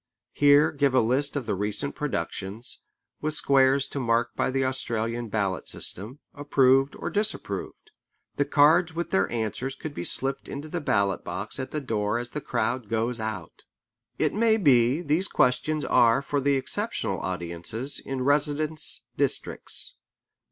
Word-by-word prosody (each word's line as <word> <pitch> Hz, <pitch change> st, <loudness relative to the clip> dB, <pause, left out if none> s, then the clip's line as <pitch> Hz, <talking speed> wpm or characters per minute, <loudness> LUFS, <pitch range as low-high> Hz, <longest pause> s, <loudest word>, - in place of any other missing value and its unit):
Here 145 Hz, +2 st, +5 dB
give 140 Hz, -3 st, +1 dB
a -, -, +6 dB
list 130 Hz, +6 st, +1 dB
of 140 Hz, -4 st, -2 dB
the 110 Hz, -, -1 dB
recent 105 Hz, +8 st, -1 dB
productions, 100 Hz, -, -4 dB, 0.4 s
with 155 Hz, 0 st, 0 dB
squares 135 Hz, -1 st, +3 dB
to 140 Hz, -, -4 dB
mark 120 Hz, -1 st, 0 dB
by -, -, 0 dB
the 135 Hz, 0 st, 0 dB
Australian 120 Hz, -2 st, -2 dB
ballot 100 Hz, -3 st, -1 dB
system: 110 Hz, +9 st, -5 dB, 0.2 s
approved 135 Hz, -1 st, +3 dB
or -, -, -5 dB
disapproved. 215 Hz, -, -2 dB, 0.5 s
The 145 Hz, -, +2 dB
cards 160 Hz, +4 st, +4 dB
with 170 Hz, +1 st, -3 dB
their 95 Hz, 0 st, +2 dB
answers 120 Hz, +4 st, -3 dB
could 150 Hz, +2 st, -7 dB
be 85 Hz, -, -5 dB
slipped 135 Hz, +8 st, 0 dB
into 145 Hz, +3 st, -6 dB
the 170 Hz, +2 st, -4 dB
ballot 100 Hz, -8 st, +1 dB
box 105 Hz, +7 st, -5 dB
at 130 Hz, -, -4 dB
the 155 Hz, -, -3 dB
door 110 Hz, -4 st, -1 dB
as 120 Hz, 0 st, -5 dB
the 150 Hz, -, -4 dB
crowd 120 Hz, -2 st, -2 dB
goes 115 Hz, +2 st, -1 dB
out. 110 Hz, -6 st, -6 dB, 0.5 s
It -, -, +1 dB
may 220 Hz, +1 st, +3 dB
be 130 Hz, -, +4 dB
these 160 Hz, +6 st, +1 dB
questions 140 Hz, +4 st, +1 dB
are 120 Hz, +3 st, +4 dB
for 145 Hz, 0 st, -1 dB
the 140 Hz, +1 st, +2 dB
exceptional 135 Hz, -, -2 dB
audiences 90 Hz, +9 st, -4 dB
in 135 Hz, -1 st, -3 dB
residence 150 Hz, +2 st, +1 dB
districts. -, -, -2 dB
130 Hz, 155 wpm, -26 LUFS, 115-145 Hz, 0.5 s, a